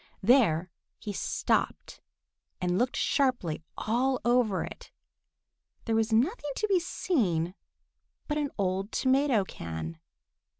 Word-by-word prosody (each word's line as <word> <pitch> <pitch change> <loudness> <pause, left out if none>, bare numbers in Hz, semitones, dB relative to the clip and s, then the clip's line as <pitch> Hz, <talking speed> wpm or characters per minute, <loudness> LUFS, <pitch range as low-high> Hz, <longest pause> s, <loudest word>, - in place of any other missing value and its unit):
There 190 - +4 0.3
he 210 - -6
stopped - - -1 0.6
and 180 +1 0
looked 250 +1 +1
sharply 250 - +1 0.2
all 250 +4 +1
over 240 -5 +3
it. - - -9 1.0
There 225 - +1
was 225 0 +1
nothing 290 - +1
to 430 - 0
be 390 -3 +3
seen 190 - 0 0.7
but 300 0 0
an 290 -1 -1
old 195 +1 -1
tomato 260 -4 +3
can. 80 - -6
225 Hz, 115 wpm, -29 LUFS, 185-270 Hz, 1.0 s, There